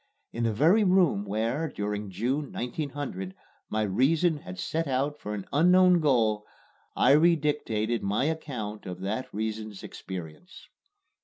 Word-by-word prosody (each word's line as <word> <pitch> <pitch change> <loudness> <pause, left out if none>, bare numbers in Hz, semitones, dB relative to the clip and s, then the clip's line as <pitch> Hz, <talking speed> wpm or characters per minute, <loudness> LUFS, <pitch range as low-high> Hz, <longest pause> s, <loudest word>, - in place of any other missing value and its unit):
In 115 0 -1
the 115 - +2
very 165 - +4
room 180 - +3
where, 115 +10 -1
during 105 -3 -4
June, 130 +9 -2
1900, 125 - -4 0.3
my 110 0 0
reason 150 - +2
had 90 -10 -9
set 160 - -2
out 140 +3 -1
for 105 0 -5
an 100 - -6
unknown 180 +3 +5
goal, 115 -8 +2 0.5
I 125 - +4
redictated 150 -8 +2
my 105 +7 0
account 125 -11 -4
of 90 0 -6
that 110 +6 -3
reason's 110 -1 -4
experiences. 90 - -9
120 Hz, 135 wpm, -28 LUFS, 105-150 Hz, 0.5 s, unknown